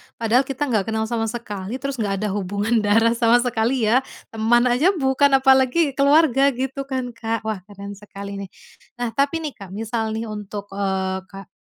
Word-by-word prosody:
padahal 235 +4 +2
kita 275 +1 -2
gak 210 -3 +1
kenal 220 0 -1
sama 225 -1 -1
sekali 215 -2 -5
terus 275 -3 -4
gak 200 -2 0
ada 210 - 0
hubungan 205 +3 0
darah 225 +2 +3
sama 235 +1 +3
sekali 240 +1 0
ya. 230 +4 +4 0.3
Teman 225 +2 +3
aja 335 +11 +3
bukan 270 -1 +3 0.2
apalagi 265 +3 +4
keluarga 280 -1 +4
gitu 270 +2 -4
kan, 260 -2 -3
Kak. 225 -1 -3
Wah 220 -3 -3
keren 200 0 -9
sekali 200 -1 -8
nih. 195 -2 -7 0.5
Nah, 240 -1 -3
tapi 285 +5 0
nih, 300 - -3
Kak, 195 -2 -9
misal 220 0 -2
nih 225 - -3
untuk, 205 -1 -7
eee, 190 -1 -1
kak 195 -1 -11
230 Hz, 180 wpm, -22 LUFS, 205-265 Hz, 0.5 s, ya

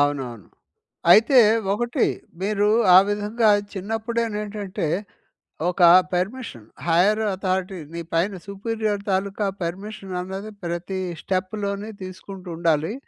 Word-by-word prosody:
అవునవును. 135 -7 -1 0.7
అయితే 230 +7 +7 0.3
ఒకటి 240 +3 0 0.4
మీరు 205 +1 +1 0.3
ఆ - - +11
విధంగా 210 +2 +1 0.2
చిన్నప్పుడేనేంటంటే 210 -2 -3 0.8
ఒక 180 +1 -3 0.3
పర్మిషన్. 185 - -3 0.2
హైర్ 190 +6 +3
అథారిటీ 190 0 -2 0.2
నీ 170 - -4
పైన 170 +5 +2 0.2
సుపీరియర్ 210 +1 -2
తాలూకా 200 +2 -1 0.2
పర్మిషన్ 195 +3 -6
అన్నది 190 +3 -6
ప్రతి 175 +2 -3 0.2
స్టెప్‌లోని 200 +2 -3
తీసుకుంటుండాలి. 180 -3 -2
195 Hz, 90 wpm, -23 LUFS, 180-210 Hz, 0.8 s, ఆ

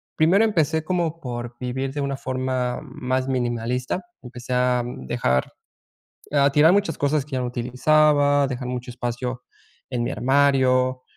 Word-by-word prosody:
primero 180 +7 +4
empecé 160 -7 +1
como, 170 -1 -1
por 120 -4 -6
vivir 130 +2 -3
de 145 - -3
una 140 -1 -2
forma 130 -1 -2
más 130 -2 -3
minimalista. 125 - -2 0.2
Empecé 125 0 -7
a 125 -1 +2
dejar 65 - -1 0.8
a 140 -1 +3
tirar 150 +4 +5
muchas 200 -5 +1
cosas 145 0 0
que 150 - -20
ya 130 - 0
no 125 - -1
utilizaba, 145 +4 +3
dejar 130 -1 -4
mucho 125 0 -5
espacio 125 0 -4 0.5
en 125 -2 -1
mi 120 - -2
armario, 130 -2 +2
130 Hz, 145 wpm, -23 LUFS, 125-145 Hz, 0.8 s, tirar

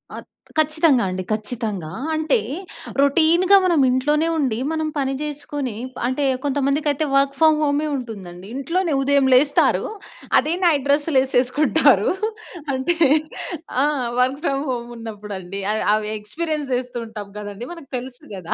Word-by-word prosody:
అత్ - - -9 0.3
ఖచ్చితంగా 310 -4 +3
అండి. 185 0 -3
ఖచ్చితంగా. 215 -6 -3 0.2
అంటే 315 -1 +2 0.6
రొటీన్‌గా 335 +7 +5
మనం 345 -4 +3
ఇంట్లోనే 295 +5 +2
ఉండి, 260 -8 0
మనం 315 -1 -1
పని 270 -1 0
చేసుకొని, 290 -4 -4 0.3
అంటే 260 +3 -1 0.2
కొంతమందికైతే 285 +1 0
వర్క్ 275 0 +2
ఫ్రమ్ 315 -1 +5
హోమే 295 +1 +1
ఉంటుందండి. 195 -8 -7
ఇంట్లోనే 335 +5 -1
ఉదయం 280 0 +3
లేస్తారు. 280 +3 +4 0.6
అదే 320 +3 -1
నైట్ 295 -5 +3
డ్రెస్సులేసేసుకుంటారు. 280 -1 +3 0.6
అంటే 265 +6 0 0.9
ఆ! - - +4 0.4
Work 260 +2 +1
from 275 -1 0
home 240 -1 -4
ఉన్నప్పుడండి. 205 -4 -7
అయి 215 - -1
అవి 215 0 0
ఎక్స్పీరియన్స్ 300 +7 -3
చేస్తూతుంటాం 230 -4 -5
కదండీ 205 +3 -7
మనకు 330 -6 -13
తెలుసు 250 0 -9
కదా. 180 -3 -4
275 Hz, 125 wpm, -21 LUFS, 230-300 Hz, 0.9 s, రొటీన్‌గా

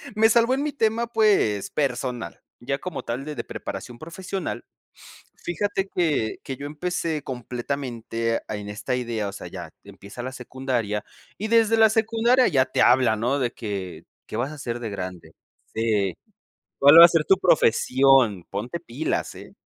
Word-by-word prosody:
me 220 +1 +5
salvó 235 +2 +4
en 275 - 0
mi 300 - -1
tema, 230 -2 0
pues, 210 - +2
personal, 125 -4 -3 0.2
ya 135 +3 -2
como 180 -6 -5
tal 125 +4 -4
de 150 -1 -6
de 115 - -4
preparación 120 - -7
profesional. 180 +3 -5 0.7
Fíjate 195 +2 -2
que 150 -11 0
que 135 - -6
yo 140 - -7
empecé 155 0 -3
completamente 120 -2 -3
a - - -4
en 105 0 -7
esta 110 +5 -3
idea. 115 -4 -2
O - - -7
sea, 100 - -8
ya - - -8
empieza 100 +5 -10
la 130 - -4
secundaria, 125 -5 -3 0.3
y 215 - -3
desde 225 0 +4
la 220 0 +6
secundaria 230 +3 +3
ya 135 -6 +3
te 130 - -1
hablan, 120 -3 +4
¿no?, 130 +5 +1
de 120 -3 0
que, 100 -5 -6 0.2
¿qué - - -8
vas 125 +5 -2
a - - -8
hacer 120 -5 -5
de 115 -2 -5
grande? 90 -4 -7 0.4
Sí, 105 -5 0 0.6
¿cuál 145 +4 +9
va 170 - +13
a - - +8
ser 165 -2 +1
tu 195 - +4
profesión? 130 - +3
Ponte 115 +12 -4
pilas, 155 -1 -3
¿eh? - - -12
135 Hz, 170 wpm, -24 LUFS, 115-180 Hz, 0.7 s, va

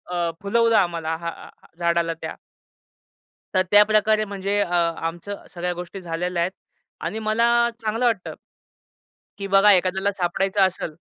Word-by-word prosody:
अ, 170 -1 0
फुलवलं 230 +3 +2
आम्हाला 165 -3 0
हां, 170 0 -7 0.3
झाडाला 170 -1 +1
त्या - - -5 1.2
तर 185 - +5
त्या 205 0 +8
प्रकारे 215 0 +3
म्हणजे 200 0 -2
अ, - - +2 0.3
आमचं 175 +5 -5
सगळ्या 180 0 -2
गोष्टी 180 +2 -8
झालेल्या 175 +1 -2
आहेत. 180 - -1 0.5
आणि 220 - -3
मला 215 +2 +1 0.4
चांगलं 225 +2 -1
वाटतं. 225 -6 -1 1.0
की 200 - -4
बघा 195 +1 +6
एखाद्याला 190 +1 +2
सापडायचं 190 +1 -1
असेल. 170 -4 -6
190 Hz, 135 wpm, -23 LUFS, 175-210 Hz, 1.2 s, त्या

